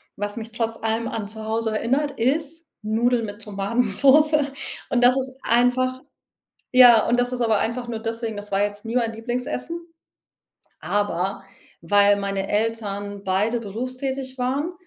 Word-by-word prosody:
was 205 +1 -4
mich 225 0 -6
trotz 230 -1 -2
allem 225 +1 -1
an 220 -3 -4
zu 220 +1 -7
Hause 220 0 -1
erinnert, 275 +6 0
ist 300 +6 -1 0.2
Nudeln 230 +2 +1
mit 205 +1 -8
Tomatensoße. 245 +9 +3 0.4
Und 245 -1 +1
das 250 +2 +6
ist 265 0 -4
einfach 250 +2 +2 0.7
ja, 245 -4 +7
und 245 - +2
das 245 +1 0
ist 250 - -3
aber 225 -2 +3
einfach 235 +3 -2
nur 235 -2 -3
deswegen, 225 -1 -4
das 205 0 -7
war 195 0 +1
jetzt 205 +1 -2
nie 225 +2 -4
mein 235 -2 +1
Lieblingsessen, 250 +8 -4 1.0
aber, 195 -1 -1 0.4
weil 205 +4 +4
meine 200 -1 -2
Eltern 205 -2 -2
beide 205 +5 0
berufstätig 255 +4 -4
waren, 275 +7 -1
230 Hz, 150 wpm, -23 LUFS, 205-255 Hz, 1.0 s, ja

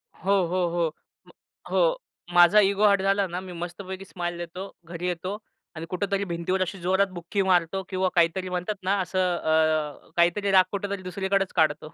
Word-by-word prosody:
हो, 195 +4 -2 0.2
हो, 180 0 0
हो, 170 -1 0 0.4
मग - - -18 0.4
हो, - - +3 0.4
माझा 175 +4 +7
इगो 200 +1 +3
हार्ट 200 -1 +4
झाला 195 +1 +2
ना, 175 +1 -4
मी 185 -1 -9
मस्तपैकी 185 +3 -7
स्माईल 175 -2 -4
देतो, 175 +3 -7
घरी 170 +1 -5
येतो 185 +3 -3 0.4
आणि 160 +1 -6
कुठेतरी 200 +2 -1
भिंतीवर 175 +1 -2
अशी 185 +1 -2
जोरात 190 +3 +2
बुखी 175 +3 -2
मारतो 185 0 +1
किंवा 185 -1 0
काहीतरी 175 +2 +2
म्हणतात 180 +4 -2
ना 195 +2 +1
असं 185 -1 0
अ, 155 -2 0
काहीतरी 185 +4 +2
राग 190 -1 +7
कुठेतरी 200 -1 -3
दुसरीकडेच 190 +1 -1
काढतो, 155 0 +1
185 Hz, 170 wpm, -26 LUFS, 170-195 Hz, 0.4 s, माझा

